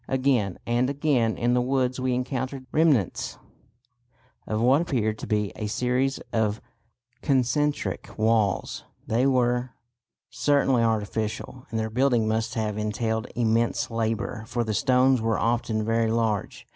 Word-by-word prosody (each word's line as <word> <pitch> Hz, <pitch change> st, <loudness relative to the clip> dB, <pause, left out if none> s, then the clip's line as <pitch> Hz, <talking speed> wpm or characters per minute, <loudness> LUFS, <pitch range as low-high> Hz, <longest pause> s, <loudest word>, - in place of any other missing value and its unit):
Again 130 Hz, -8 st, +1 dB
and 120 Hz, +2 st, +1 dB
again 140 Hz, -6 st, +1 dB
in 120 Hz, +1 st, +1 dB
the 125 Hz, -, +3 dB
woods 130 Hz, 0 st, 0 dB
we 130 Hz, -1 st, 0 dB
encountered 130 Hz, +1 st, -3 dB
the -, -, -26 dB
remnants 150 Hz, -, +2 dB, 1.1 s
of 110 Hz, -, -1 dB
what 130 Hz, +6 st, +4 dB
appeared 110 Hz, -10 st, -1 dB
to -, -, -6 dB
be 105 Hz, -2 st, 0 dB
a 110 Hz, -, -4 dB
series 125 Hz, +5 st, 0 dB, 0.2 s
of 110 Hz, -1 st, +1 dB, 0.6 s
concentric 140 Hz, +2 st, 0 dB
walls. 110 Hz, -3 st, +1 dB, 0.2 s
They 120 Hz, +4 st, +2 dB
were 125 Hz, -1 st, +1 dB, 0.6 s
certainly 135 Hz, -1 st, +2 dB
artificial, 110 Hz, +2 st, -2 dB
and 110 Hz, -, -2 dB
their 110 Hz, 0 st, -2 dB
building 120 Hz, -2 st, +2 dB
must 110 Hz, +2 st, -1 dB
have 105 Hz, -2 st, -2 dB
entailed 110 Hz, +1 st, -2 dB
immense 115 Hz, 0 st, +1 dB
labour, 110 Hz, -2 st, -2 dB
for 120 Hz, 0 st, -1 dB
the 110 Hz, -1 st, -2 dB
stones 130 Hz, +2 st, +3 dB
were 115 Hz, -1 st, +1 dB
often 115 Hz, -2 st, 0 dB
very 115 Hz, 0 st, +1 dB
large. 110 Hz, -3 st, -1 dB
120 Hz, 140 wpm, -25 LUFS, 110-130 Hz, 1.1 s, what